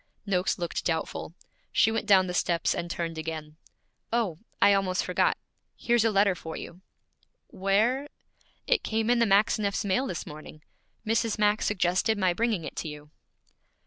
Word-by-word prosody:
Noakes 185 -2 0
looked 175 -2 -3
doubtful. 165 0 -3 0.4
She 220 - +3
went 225 -1 -2
down 190 -3 +6
the 180 - -4
steps 170 -1 +1
and 170 - -4
turned 165 -2 -3
again. 155 -1 -6 0.5
'Oh, 220 -9 0 0.2
I 200 0 +6
almost 195 -2 +1
forgot - - +1 0.4
here's 240 -2 +2
a 225 - +3
letter 200 -1 +3
for 160 -2 -8
you.' 175 +2 -9 0.7
'Where 220 +9 +1 0.3
' - - -37
'It - - +2
came 220 +1 0
in 245 - +3
the 230 - +3
Maxineffs' 205 +1 +2
mail 250 +8 +1
this 175 - -4
morning. 155 0 -11 0.4
Mrs. 225 0 0
Max 210 0 +2
suggested 190 +2 +1
my 185 -3 +2
bringing 220 -2 0
it 150 - -7
to - - -3
you.' 150 0 -9
195 Hz, 165 wpm, -27 LUFS, 170-220 Hz, 0.7 s, down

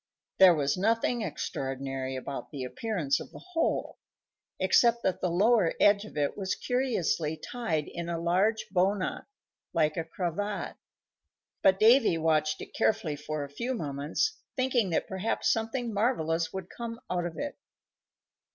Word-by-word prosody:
There 185 -2 +9
was 145 +2 0
nothing 230 +4 +1
extraordinary 135 -7 -3
about 135 +1 -5
the 140 -3 -5
appearance 175 - -1
of - - -8
the - - -11 0.2
hole 330 - 0 0.6
(except 235 -1 +4
that 185 - 0
the 180 - +1
lower 200 +1 +3
edge 205 0 +5
of 215 - -11
it 145 -1 0
was 190 -2 -2
curiously 195 - 0
tied 165 -12 -2
in 170 0 -5
a 170 - -1
large 190 +6 +1
bow 190 +2 +3
knot, 185 - -4 0.5
like 155 -3 +2
a 165 - 0
cravat); 185 +5 -3 0.8
but 190 0 +4
Davy 225 -4 +6
watched 155 -1 +1
it - - -9
carefully 160 -8 +1
for 150 0 -4
a - - -5
few 235 - -3
moments, 150 - -2 0.2
thinking 255 -6 +1
that 165 - 0
perhaps 190 +3 0
something 225 +1 -2
marvellous 165 -7 0
would 190 -2 -6
come 230 -1 -6
out 175 -1 -1
of 170 - -9
it. 290 0 -5
185 Hz, 150 wpm, -29 LUFS, 155-225 Hz, 0.8 s, There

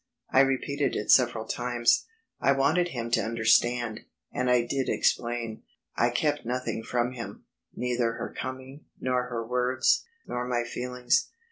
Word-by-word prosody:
I - - +5
repeated 135 +1 +1
it 105 - +1
several 120 -3 +4
times. 120 0 +1 0.3
I 140 - +4
wanted 150 +6 +2
him 115 -7 -5
to - - +3
understand, 115 0 +2 0.3
and 125 0 -1
I 125 -1 +4
did 135 +1 -1
explain. 120 -2 0 0.3
I 120 - +3
kept 145 +4 0
nothing 125 -1 -2
from 120 +2 -1
him; 120 -2 -8 0.3
neither 120 -2 0
her - - -6
coming, 130 +2 -7
nor 125 -1 0
her 115 -2 -4
words, 125 +2 +2 0.2
nor 125 0 -3
my 120 -1 0
feelings. 125 - 0
125 Hz, 145 wpm, -27 LUFS, 120-130 Hz, 0.3 s, I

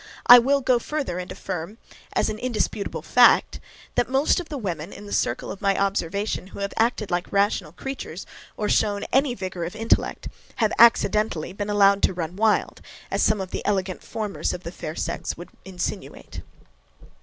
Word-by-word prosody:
I 245 0 +11
will, 275 +3 +2
go 255 -2 +3
further, 275 - -3
and 180 - -6
affirm, 185 +3 -6 0.4
as - - +1
an 215 0 -4
indisputable 215 -4 -2
fact, - - +4 0.3
that 245 - +1
most 270 +6 +2
of 350 - -7
the 295 - -4
women, 175 - -4
in 205 - -10
the 205 - -7
circle 120 - -1
of 195 - -9
my 195 -1 +2
observation, 200 0 -1
who 200 - -11
have 200 - -3
acted 225 -3 0
like 175 0 -2
rational 200 -5 +1
creatures, 225 -4 -7 0.3
or 210 - -1
shown 205 -1 +1
any 270 -2 +3
vigour 185 -3 -5
of 170 +5 -5
intellect, 225 +1 0 0.3
have 220 -1 +1
accidentally 215 -6 +4
been 205 +1 -4
allowed 200 -1 +4
to 185 - +1
run 170 0 -4
wild, 215 +1 +1 0.3
as - - 0
some 215 -1 +3
of 190 -1 -5
the - - -4
elegant 190 -2 -1
formers 215 -3 -3
of 180 0 -7
the 170 - -6
fair 155 -3 -7
sex - - -3
would 175 - -10 0.2
insinuate. 185 -2 -6
200 Hz, 180 wpm, -24 LUFS, 185-225 Hz, 0.4 s, I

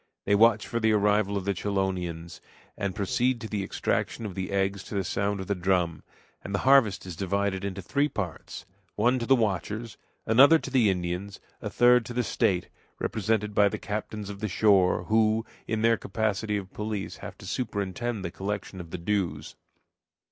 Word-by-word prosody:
They - - +2
watch 110 +1 +5
for 115 - -2
the 110 -1 +3
arrival 105 -1 +2
of 95 - -4
the 100 - +1
chelonians, 90 -4 -3 0.3
and 100 -2 -3
proceed 120 +5 0
to 110 - -5
the 105 -2 -2
extraction 110 +3 -2
of 100 - -5
the 95 +1 -4
eggs 100 0 0
to - - -7
the 100 - 0
sound 100 +2 -1
of 95 - -4
the 100 - 0
drum; 90 -4 0 0.4
and 100 - -3
the 100 - -3
harvest 130 -9 +5
is 90 -3 -7
divided 100 +1 -1
into 95 -1 -4
three 140 - +1
parts 90 - -5 0.3
one 120 +4 +2
to 115 - -4
the 135 - +6
watchers, 110 0 -2 0.3
another 135 +8 +7
to 135 - -7
the 125 -6 +4
Indians, 90 +2 -3 0.2
a - - -4
third 125 0 +5
to 120 - -7
the 125 - +1
state, 90 -5 0 0.3
represented 105 -1 -1
by 100 0 +5
the - - -4
captains 105 -1 -5
of 100 - -9
the 110 - -2
shore, 95 -2 +3
who, 110 +2 +2 0.2
in 110 -1 -1
their 115 0 +4
capacity 105 0 -1
of 95 -2 -7
police, 105 -2 -4
have - - -9
to - - -12
superintend 100 0 -3
the 85 - -3
collection 95 -1 -4
of 85 - -11
the 90 - -5
dues. 85 -5 -2
100 Hz, 190 wpm, -27 LUFS, 95-110 Hz, 0.4 s, another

